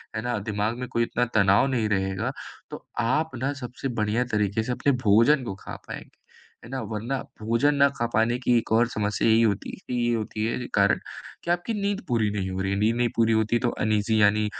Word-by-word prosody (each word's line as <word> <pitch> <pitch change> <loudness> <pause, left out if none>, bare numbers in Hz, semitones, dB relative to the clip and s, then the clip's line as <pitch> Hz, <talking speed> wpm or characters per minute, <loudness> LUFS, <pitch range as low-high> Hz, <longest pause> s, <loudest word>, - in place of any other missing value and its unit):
है 110 - -2
ना? 120 -1 -2
दिमाग 105 +2 -2
में 125 - -4
कोई 115 -2 +1
इतना 120 +1 0
तनाव 100 +4 +4
नहीं 120 -5 0
रहेगा, 95 -2 -1 0.4
तो - - -9
आप 150 +7 +1
ना 135 +4 -1
सबसे 125 +2 -5
बढ़िया 110 +4 +1
तरीके 105 +1 +1
से 125 - -3
अपने 140 +3 +1
भोजन 115 +7 +4
को 100 -4 -4
खा - - -7
पाएँगे। - - -9 0.5
है - - -11
ना? 135 -1 -3
वरना 110 +5 -3 0.2
भोजन 115 +7 +2
ना 140 0 +5
खा 120 - 0
पाने 115 +3 +2
की 125 -1 +3
एक 115 - -3
और 115 +1 +4
समस्या 105 -2 -1
यही 110 +1 +5
होती 105 -3 0 0.2
कि - - -4
ये 120 - +2
होती 110 -1 -3
है 115 - -1
जी 125 - -5
कारण 100 0 +3 0.4
कि 170 - -1
आपकी 175 +6 -1
नींद 200 0 -1
पूरी 115 -5 +1
नहीं 95 -2 -2
हो 95 +1 -3
रही 95 - -1
है। 100 - 0
नींद 110 +2 +2
नहीं 120 -1 +2
पूरी 115 -1 +3
होती, 110 +2 +2
तो 120 - +1 0.2
अनईज़ी 110 0 +2
यानी 105 +1 +4
115 Hz, 225 wpm, -25 LUFS, 105-125 Hz, 0.5 s, ना